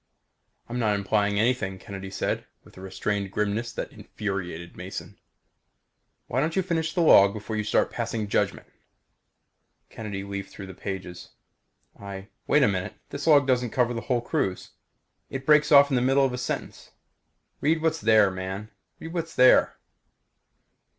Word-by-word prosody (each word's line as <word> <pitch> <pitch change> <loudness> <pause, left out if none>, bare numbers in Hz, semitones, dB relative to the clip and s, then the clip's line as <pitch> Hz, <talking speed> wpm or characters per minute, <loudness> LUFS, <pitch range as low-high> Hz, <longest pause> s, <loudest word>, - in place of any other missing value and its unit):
"I'm 120 +1 -4
not 105 -3 +2
implying 100 +1 +1
anything," 110 -5 0
Kennedy 95 0 -8
said 95 - -3 0.2
within 95 - -15
a - - -10
restrained 100 +1 -2
grimness 105 +4 -1
that - - -5
infuriated 90 -4 -5
Mason. - - -8 1.1
"Why 125 - -1
don't 160 +4 0
you 190 - +2
finish 165 -3 -1
the 175 - +2
log 100 -11 +7
before 110 +1 -5
you 105 - -1
start 105 - +1
passing 115 -2 -3
judgment?" - - 0 1.3
Kennedy 105 -3 -5
leafed 100 -1 -6
through 100 - -9
the 95 - -9
pages. 95 -2 -7 0.7
"I 100 0 -8 0.2
wait 150 - +4
a - - +5
minute! 95 -2 -2 0.2
This 140 +3 -5
log 145 -3 +6
doesn't 125 -2 +1
cover 120 +1 +1
the 115 - -4
whole 125 -2 0
cruise! 95 -5 -2 0.6
It 135 0 -6
breaks 150 0 +4
off 140 -1 +7
in - - +2
the 125 - +2
middle 135 +2 +3
of 130 - -1
a - - -3
sentence!" 125 - -5 0.7
"Read 160 +2 +1
what's 160 0 +1
there, 110 -3 +5
man! 95 +3 -6 0.3
Read 165 +1 -8
what's 165 -2 -4
there." 130 0 +5
110 Hz, 160 wpm, -26 LUFS, 100-135 Hz, 1.3 s, log